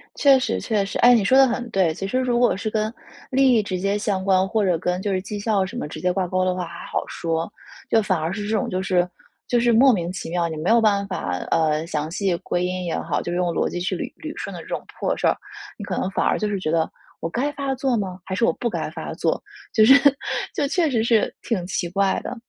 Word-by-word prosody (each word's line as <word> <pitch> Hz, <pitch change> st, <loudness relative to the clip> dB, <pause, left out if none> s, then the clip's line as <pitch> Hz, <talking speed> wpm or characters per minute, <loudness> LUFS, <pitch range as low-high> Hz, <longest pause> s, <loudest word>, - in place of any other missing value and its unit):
确 275 Hz, -2 st, +6 dB
实 255 Hz, -, -1 dB
确 215 Hz, -3 st, 0 dB
实。 195 Hz, -, -4 dB
哎， 245 Hz, +1 st, +7 dB
你 225 Hz, -4 st, +4 dB
说 260 Hz, +7 st, +4 dB
得 270 Hz, -1 st, +7 dB
很 240 Hz, 0 st, -3 dB
对。 190 Hz, -6 st, +2 dB
其 195 Hz, +4 st, -4 dB
实 255 Hz, +6 st, 0 dB
如 245 Hz, -2 st, +1 dB
果 245 Hz, -, +3 dB
是 210 Hz, +3 st, -3 dB
跟 215 Hz, +1 st, -1 dB, 0.4 s
利 265 Hz, -1 st, +4 dB
益 225 Hz, -, +4 dB
直 185 Hz, -3 st, -3 dB
接 200 Hz, +2 st, 0 dB
相 200 Hz, -3 st, -1 dB
关， 190 Hz, -1 st, +3 dB
或 215 Hz, 0 st, +1 dB
者 180 Hz, -3 st, +2 dB
跟 180 Hz, +3 st, -2 dB
就 200 Hz, 0 st, -1 dB
是 185 Hz, -, 0 dB
绩 205 Hz, +2 st, -6 dB
效 205 Hz, -2 st, +1 dB
什 190 Hz, -, -8 dB
么 -, -, -3 dB
直 -, -, -8 dB
接 180 Hz, 0 st, +2 dB
挂 185 Hz, 0 st, -1 dB
钩 185 Hz, +1 st, 0 dB
的 185 Hz, 0 st, +1 dB
话 180 Hz, -1 st, -3 dB
还 170 Hz, 0 st, -9 dB
好 -, -, -2 dB
说。 165 Hz, +2 st, -3 dB, 0.4 s
就 225 Hz, -, +4 dB
反 195 Hz, -3 st, 0 dB
而 160 Hz, +2 st, -2 dB
是 205 Hz, +1 st, -4 dB
这 220 Hz, -, 0 dB
种， -, -, -1 dB
就 185 Hz, -, -1 dB
是 180 Hz, -2 st, +2 dB, 0.4 s
就 240 Hz, -, +2 dB
是 240 Hz, 0 st, +3 dB
莫 265 Hz, +4 st, +6 dB
名 175 Hz, -3 st, -2 dB
其 185 Hz, -, -6 dB
妙， 170 Hz, 0 st, 0 dB
你 160 Hz, -, -5 dB
没 155 Hz, +4 st, -1 dB
有 230 Hz, +1 st, +6 dB
办 200 Hz, -2 st, +2 dB
法 135 Hz, -, -3 dB, 0.2 s
呃， 155 Hz, -1 st, +2 dB
详 155 Hz, -2 st, -2 dB
细 190 Hz, -1 st, 0 dB
归 175 Hz, -, -2 dB
因 185 Hz, 0 st, -3 dB
也 170 Hz, -, -2 dB
好， -, -, -1 dB
就 175 Hz, -, -4 dB
用 180 Hz, 0 st, 0 dB
逻 -, -, +1 dB
辑 175 Hz, -, -4 dB
去 180 Hz, -, -1 dB
捋 -, -, -5 dB, 0.2 s
捋 -, -, -7 dB
顺 -, -, -5 dB
的 -, -, -7 dB
这 -, -, -13 dB
种 -, -, -4 dB, 0.2 s
破 -, -, 0 dB
事 -, -, -2 dB
儿， -, -, +3 dB, 0.4 s
你 210 Hz, -, -7 dB
可 185 Hz, -, -3 dB
能 -, -, -1 dB
反 -, -, 0 dB
而 -, -, +2 dB
就 210 Hz, -, -1 dB
是 200 Hz, -2 st, -2 dB
觉 170 Hz, -, -2 dB
得： 165 Hz, -1 st, +2 dB, 0.3 s
“我 -, -, -1 dB
该 260 Hz, -, -1 dB
发 275 Hz, -1 st, -2 dB
作 255 Hz, -2 st, 0 dB
吗？ 185 Hz, -3 st, -4 dB
还 190 Hz, -, -3 dB
是 230 Hz, -, +2 dB
我 -, -, +2 dB
不 240 Hz, -, -2 dB
该 -, -, -3 dB
发 -, -, -6 dB
作？” -, -, 0 dB, 0.3 s
就 220 Hz, -, +5 dB
是 265 Hz, -, +9 dB, 0.6 s
就 285 Hz, -, +1 dB
确 325 Hz, +2 st, +1 dB
实 230 Hz, -5 st, +1 dB
是 230 Hz, -2 st, +2 dB
挺 200 Hz, -7 st, -2 dB
奇 180 Hz, -1 st, -2 dB
怪 195 Hz, +2 st, +1 dB
的。 -, -, -5 dB
195 Hz, 295 characters per minute, -23 LUFS, 180-230 Hz, 0.6 s, 是